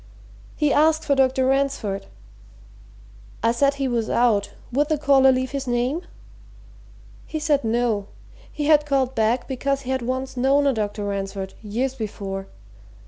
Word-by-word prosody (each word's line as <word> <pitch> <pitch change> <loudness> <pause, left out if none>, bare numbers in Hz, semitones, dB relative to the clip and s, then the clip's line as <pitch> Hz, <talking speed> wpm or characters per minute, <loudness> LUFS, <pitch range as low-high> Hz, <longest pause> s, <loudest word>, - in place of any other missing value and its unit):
"He 300 -2 +2
asked 315 +1 +3
for 285 - +2
Dr. 265 -1 +2
Ransford. 270 -7 0 1.4
I 230 - +4
said 275 +4 +2
he 275 -1 -1
was 235 -3 -1
out 225 -4 +2 0.2
would 290 +5 +1
the 310 - +2
caller 275 -2 +5
leave 260 0 -1
his 275 -1 -4
name? 245 +7 0 1.3
He 315 - -4
said 295 -3 +1
no 225 -3 0 0.4
he 295 - -3
had 300 -1 +4
called 265 -2 +1 0.3
because 275 +1 -1
he 260 -1 -5
had 260 -1 0
once 260 +2 -3
known 270 +3 +3
a 275 - +3
Dr. 210 -2 -3
Ransford, 195 -1 -4
years 235 +5 -2
before. 195 -4 -5
260 Hz, 145 wpm, -23 LUFS, 225-280 Hz, 1.4 s, caller